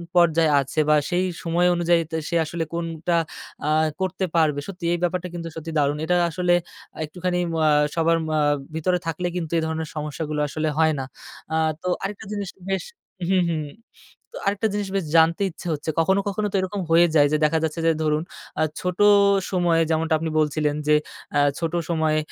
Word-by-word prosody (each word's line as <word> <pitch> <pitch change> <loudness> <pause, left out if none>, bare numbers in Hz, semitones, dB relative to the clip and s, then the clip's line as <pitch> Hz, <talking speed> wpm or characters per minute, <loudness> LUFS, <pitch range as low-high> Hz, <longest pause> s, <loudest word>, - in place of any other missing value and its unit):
পর্যায়ে 165 -2 +4
আছে, 135 +3 -4
বা 150 - +6
সেই 180 +1 +1 0.2
সময় 175 +1 +2
অনুযায়ী 170 0 +3
তা 160 - -1
সে 170 - -2
আসলে 165 +1 -3
কোনটা 165 0 -2 0.5
আ - - +2 0.3
করতে 190 0 -1
পারবে। 155 -3 +3
সত্যি 185 -3 -7
এই - - +1
ব্যাপারটা 180 +1 -1
কিন্তু 170 -1 -5
সত্যি 160 0 -6
দারুণ। 145 0 +1
এটা 180 - +2
আসলে 175 +2 +1 0.5
একটুখানি 180 +3 -2 0.3
আ - - +5 0.3
সবার 165 0 +3 0.6
ভিতরে 180 +3 +1
আ - - -20
থাকলে 165 +2 -2
কিন্তু 165 -3 -3
এই - - +2
ধরনের 160 -1 -3
সমস্যাগুলো 150 0 -3
আসলে 155 +2 -2
হয় 160 -1 +4
না। 130 - -3 0.5
আ - - +1 0.3
তো - - -3 0.2
আরেকটা 200 -1 -5
জিনিস 200 -2 -3 0.2
বেশ 195 - 0 0.5
হুম, 190 -1 +3
হুম, 155 -2 -2 0.7
তো - - -10
আরেকটা 200 +2 +1
জিনিস 205 0 -2 0.3
জানতে 165 +4 +4
ইচ্ছে 170 - -12
হচ্ছে। 155 +1 -3
কখনো, 190 +4 +3
কখনো 210 +1 -1
তো - - +1
এরকম 190 +2 -3
হয়ে 170 +1 +6
যায় 145 -2 +5
যে - - +4
দেখা 155 +2 +3
যাচ্ছে 160 +1 -2
যে 165 - +5
ধরুন 155 0 +1 0.4
আ - - +3 0.2
ছোট 180 0 -3 0.5
সময়ে 175 -3 +2
যেমনটা 160 0 +1
আপনি 160 +1 -3
বলছিলেন 150 -1 +1
যে 150 - +6 0.4
আ - - +5 0.2
ছোট 165 -1 -2 0.2
সময়ে 160 -2 +1
165 Hz, 185 wpm, -23 LUFS, 155-180 Hz, 0.7 s, বা